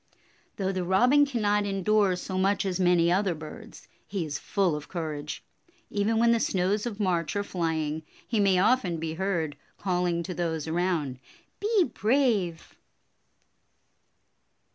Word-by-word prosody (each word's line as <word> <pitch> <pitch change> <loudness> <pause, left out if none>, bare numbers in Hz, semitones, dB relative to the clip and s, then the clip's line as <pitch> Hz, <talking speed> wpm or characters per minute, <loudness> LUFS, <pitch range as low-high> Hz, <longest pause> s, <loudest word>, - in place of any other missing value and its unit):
Though 195 -1 -1
the 185 -1 -2
Robin 250 +11 +4
cannot 210 -5 +1
endure 195 0 +2
so 185 +1 -5
much 195 +1 +2
as 190 -1 -1
many 175 -2 +4
other 190 -1 +1
birds, 190 +9 -11 0.2
he 195 -5 -2
is 145 -2 -4
full 190 -6 0
of 150 0 -7
courage. 155 -4 -5 0.5
Even 210 +2 +1
when 235 +1 +4
the 230 - +3
snows 200 +3 0
of 215 -3 -6
March 175 -5 0
are 205 - 0
flying, 160 -5 -2 0.3
he 225 - 0
may 195 -2 +4
often 195 -3 +2
be 160 0 -3
heard 170 -4 -1 0.2
calling 180 -2 0
to 180 - -5
those 160 -3 -2
around, 160 -6 -1 0.4
"Be 420 -2 +3
brave." 220 - 0
185 Hz, 140 wpm, -27 LUFS, 170-210 Hz, 0.5 s, Robin